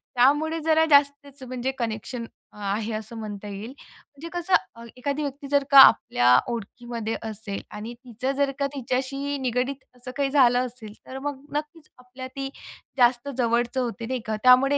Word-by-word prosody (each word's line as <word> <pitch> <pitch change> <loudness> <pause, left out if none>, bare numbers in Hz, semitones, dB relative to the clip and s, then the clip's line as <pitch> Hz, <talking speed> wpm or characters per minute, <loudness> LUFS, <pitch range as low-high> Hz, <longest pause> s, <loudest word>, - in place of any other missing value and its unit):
त्यामुळे 295 +6 +3
जरा 320 0 +4
जास्तच 280 -1 +3
म्हणजे 255 +1 -3
कनेक्शन 230 +1 -4 0.3
अ, - - -16
आहे 210 +3 -2
असं 215 +2 -6
म्हणता 210 -1 -6
येईल. 205 +3 -6
म्हणजे 295 +4 -13
कसं 350 +1 -2 0.2
अ, 230 - -11
एखादी 285 +3 -2
व्यक्ती 280 0 -5
जर 285 -1 +4
का 275 - +10
आपल्या 125 - +6 0.2
ओळखीमध्ये 230 0 -5
असेल 210 -2 -6 0.2
आणि 225 +3 -6
तिचं 250 +2 -3
जर 280 -1 +2
का 280 - +1
तिच्याशी 275 +2 -2
निगडीत 255 +2 0 0.2
असं 250 +1 -9
काही 275 -1 +1
झालं 255 -3 +4
असेल 230 -4 -9
तर 260 - -7
मग 275 -1 -4
नक्कीच 305 +1 -5
आपल्या 250 +1 -9
ती 270 0 -3 0.5
जास्त 245 +2 +3
जवळचं 240 +2 +1
होते 235 -1 -4
नाही 255 +1 -2
का. 215 0 -1
त्यामुळे 260 +3 +6
255 Hz, 165 wpm, -25 LUFS, 230-280 Hz, 0.5 s, का